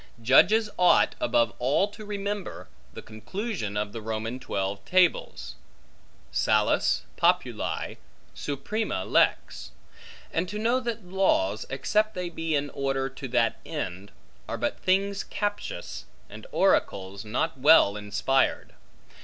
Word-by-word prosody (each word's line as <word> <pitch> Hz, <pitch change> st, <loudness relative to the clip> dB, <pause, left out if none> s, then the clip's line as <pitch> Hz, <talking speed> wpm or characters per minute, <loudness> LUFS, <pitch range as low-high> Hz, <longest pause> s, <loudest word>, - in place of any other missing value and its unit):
Judges 185 Hz, -, +5 dB
ought 180 Hz, -1 st, +5 dB
above 115 Hz, -1 st, +2 dB
all 135 Hz, +10 st, +2 dB
to 215 Hz, +1 st, -11 dB
remember 205 Hz, -1 st, -5 dB, 0.2 s
the -, -, -10 dB
conclusion 110 Hz, -, -5 dB
of 105 Hz, 0 st, -2 dB
the 115 Hz, -, -6 dB
Roman 110 Hz, +3 st, -4 dB
Twelve 100 Hz, -4 st, -3 dB
Tables; 175 Hz, -, +1 dB, 0.8 s
Salus 105 Hz, -1 st, +2 dB
populi -, -, 0 dB, 0.4 s
suprema 145 Hz, -, -3 dB
lex; 60 Hz, -, +1 dB, 0.6 s
and 175 Hz, +2 st, -1 dB
to 210 Hz, -, -4 dB
know 235 Hz, +4 st, +2 dB
that 235 Hz, -5 st, -4 dB
laws, 145 Hz, -, +1 dB
except 215 Hz, +10 st, 0 dB
they 180 Hz, -1 st, -3 dB
be 165 Hz, -1 st, -2 dB
in 145 Hz, 0 st, -1 dB
order 135 Hz, -1 st, -1 dB
to 135 Hz, +1 st, -8 dB
that 120 Hz, -2 st, +1 dB
end, 95 Hz, +3 st, -5 dB, 0.4 s
are -, -, -2 dB
but -, -, -2 dB
things 195 Hz, +2 st, +1 dB
captious, 205 Hz, -, -4 dB, 0.3 s
and -, -, -10 dB
oracles 100 Hz, 0 st, +1 dB
not 130 Hz, +8 st, -2 dB
well 140 Hz, -8 st, +6 dB
inspired. 105 Hz, +6 st, 0 dB
135 Hz, 120 wpm, -27 LUFS, -, 0.8 s, well